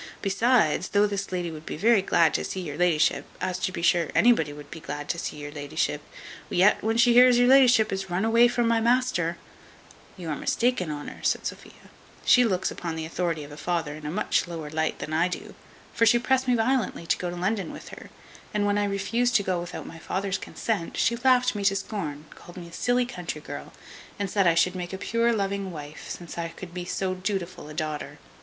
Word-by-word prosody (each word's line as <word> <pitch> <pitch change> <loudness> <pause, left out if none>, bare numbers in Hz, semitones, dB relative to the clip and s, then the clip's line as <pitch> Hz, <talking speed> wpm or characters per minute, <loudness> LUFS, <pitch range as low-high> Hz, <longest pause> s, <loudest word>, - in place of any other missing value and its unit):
Besides, 195 -4 +2
though 205 +1 +3
this 200 -2 -3
lady 175 -2 -2
would 155 -1 -9
be - - -4
very 220 +3 +4
glad 165 -4 +3
to - - 0
see 190 - -4
your 150 -5 -5
la'ship, 165 -2 +2 0.2
as 185 -1 -2
to 185 - -1
be 170 - -5
sure 170 -2 +3
anybody 215 -11 +4
would 145 0 -11
be 165 - -7
glad 145 -1 -6
to 170 - -1
see 150 - -5
your 145 0 -7
la'ship, 150 0 -2 0.5
yet 195 +4 +4
when 225 +1 +1
she 235 0 +5
hears 250 0 +7
your 245 0 +4
la'ship 250 -4 +6
is 190 0 -4
run 180 +4 0
away 230 +2 +5
from 240 -1 0
my 230 -1 +2
master 235 -8 +1 0.4
" - - -24
"You 175 -3 -6
are - - -1
mistaken, 235 - 0
Honour," 145 -1 -6
says - - +1
Sophia: - - -8 0.3
"she 250 - +6
looks 190 -6 0
upon 170 -2 -5
the 160 0 -4
authority 165 -1 -2
of 145 - -11
a 145 - -10
father 165 -2 -2
in 155 0 -10
a - - -2
much 185 +1 0
lower 160 -3 -6
light 160 0 -1
than 155 - -6
I 165 +3 +3
do; 180 - -6 0.4
for 230 - +3
she 240 +3 +6
pressed 260 +2 +1
me 250 - +4
violently 235 -6 0
to - - +1
go 180 - -2
to 175 - -5
London 190 0 -1
with - - -10
her, - - -11 0.5
and 205 -1 +2
when 205 0 +2
I 205 - +1
refused 230 +5 0
to 205 - +4
go 185 -2 -1
without 175 +1 -7
my 165 - -10
father's 190 +3 -2
consent, 200 -5 -3
she 235 - +2
laughed 250 0 +3
me 205 -2 -4
to 195 0 +4
scorn, 170 -7 -4
called 175 - -14
me 170 -1 -9
silly 245 0 +1
country 180 -10 -6
girl, - - -8 0.5
and 200 -2 -3
said, 195 -3 +3
I 165 - +4
should 175 +2 +3
make 180 0 -5
a - - -3
pure 230 +4 +1
loving 200 -2 -1
wife, 150 -3 -9
since 170 -1 -7
I 165 - -2
could 175 +1 -10
be 180 -1 -5
so 185 +1 -2
dutiful 185 -4 -4
a 155 - -9
daughter. 150 -2 -4
185 Hz, 225 wpm, -26 LUFS, 165-225 Hz, 0.5 s, hears